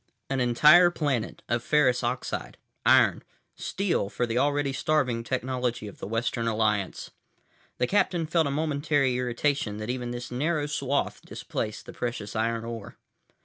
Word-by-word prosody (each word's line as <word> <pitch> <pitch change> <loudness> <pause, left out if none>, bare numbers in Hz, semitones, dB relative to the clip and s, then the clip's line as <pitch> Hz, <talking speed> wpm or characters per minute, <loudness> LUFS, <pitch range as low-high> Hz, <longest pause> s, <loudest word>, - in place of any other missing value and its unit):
An 135 - 0
entire 150 +9 +6
planet 145 -9 -2
of 120 0 0
ferrous 130 -5 +3
oxide—iron—steel 125 - -1
for 120 - -1
the 120 +1 0
already 145 -1 +1
starving 135 -4 0
technology 125 -2 -2
of 100 - -11
the - - -5
Western 115 +1 -1
Alliance. 105 -3 0 0.7
The - - +2
captain 175 -1 +1
felt 160 -1 +2
a - - -1
momentary 145 -2 +1
irritation 125 -2 -1
that 110 +3 -3
even 125 -1 -4
this 120 0 -6
narrow 150 +4 0
swath 140 -1 -1
displaced 105 0 -5
the - - -10
precious 110 -4 -4
iron 115 +1 -1
ore. 115 -3 -7
125 Hz, 140 wpm, -27 LUFS, 115-145 Hz, 0.7 s, entire